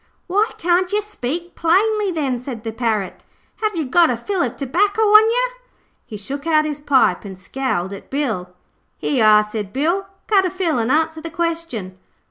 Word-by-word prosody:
'Why 410 +5 +1
can't 355 +2 +1
yer 415 - +2
speak 345 -4 -5
plainly, 405 +5 +2
then,' 275 -7 -1
said 245 -3 -7
the 225 - -3
Parrot. 220 -4 -2 0.4
'Have 430 -3 -1
you 320 -3 -1
got 335 +6 +4
a 245 - 0
fill 375 - -2
of 245 -2 -2
tobacco 370 - 0
on 430 +1 +7
yer?' - - 0 0.5
He 215 - -7
took 280 +9 -6
out 310 -1 +3
his 300 -1 -3
pipe 270 -11 +2
and 195 -2 -8
scowled 190 -2 -3
at 200 - -10
Bill. 225 -11 -2 0.5
'Here - - -2
you 230 - +3
are,' 215 0 +6
said 210 -2 -5
Bill. 340 - 0 0.2
'Cut 400 -3 +4
a 370 - 0
fill 345 -7 -1
an' 225 +1 0
answer 320 +2 +1
the 330 - -6
question.' 325 - -4
305 Hz, 190 wpm, -20 LUFS, 230-370 Hz, 0.5 s, on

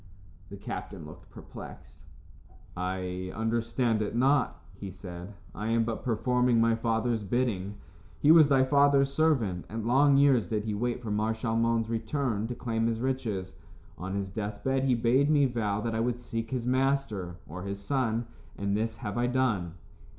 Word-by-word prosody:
The 100 - -8
captain 100 -3 -6
looked 75 - -13
perplexed. - - -12 0.7
"I 90 0 -3
understand 115 0 0
it 105 +1 -2
not," 130 +1 +2
he 95 +1 -8
said. 90 +1 -9 0.2
"I 105 +2 -4
am 115 0 +2
but 115 -1 -4
performing 125 +1 +2
my 115 0 +4
father's 115 0 0
bidding. 105 -2 -1 0.4
He 150 - +5
was 160 -3 +8
thy 135 -2 +4
father's 140 0 +4
servant, 130 - +1
and 110 0 -4
long 135 +3 +5
years 140 -5 +4
did 105 -2 -1
he 110 -1 -2
wait 120 +3 -2
for 110 - -4
Mar 110 +2 +1
Shalmon's 115 0 0
return 115 -2 -1
to 125 - -4
claim 115 -2 -1
his 115 -1 -1
riches. 115 -8 -2 0.4
On 95 +2 -5
his 100 -1 -3
death 105 0 -5
bed 135 0 +1
he 130 -2 +3
bade 125 +5 +3
me 145 -2 +4
vow 110 -5 -1
that 115 +1 -2
I 110 - -1
would 120 +1 0
seek 115 -2 -4
his 125 -2 -2
master, 130 -8 0
or 90 +4 -7
his 100 +1 -5
son, 115 0 -1 0.3
and 100 0 -1
this 110 +1 -1
have 105 -2 -4
I 120 - +2
done." 115 -10 0
115 Hz, 170 wpm, -29 LUFS, 100-125 Hz, 0.7 s, was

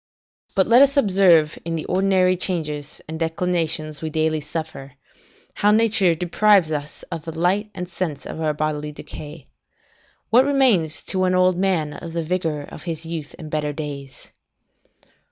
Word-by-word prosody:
Let 230 +6 +5
us 280 0 +5
but 280 - +6
observe 180 -6 +4
in 165 0 -3
the 160 - -4
ordinary 185 -1 +2
changes 150 -5 -3
and 160 +1 -6
declinations 160 -3 -1
we 160 - -3
daily 155 0 0
suffer, 150 -2 -6 0.6
how 205 - +2
nature 215 -5 +3
deprives 180 +1 +3
us 150 -1 -5
of 165 -3 -5
the 165 -1 -6
light 190 +5 +1
and 180 0 -5
sense 170 -5 -4
of 160 - -6
our 155 -1 +1
bodily 150 0 -2
decay. 150 0 -10 0.9
What 245 +3 +6
remains 235 - +2
to 185 -1 0
an 185 0 +2
old 185 0 +4
man 175 -5 0
of 165 +1 -8
the 165 -1 -2
vigour 160 -3 -2
of - - -11
his 165 0 -4
youth 160 -3 -6
and 155 -3 -9
better 150 -1 -1
days? 140 -3 -8
165 Hz, 160 wpm, -22 LUFS, 155-185 Hz, 0.9 s, but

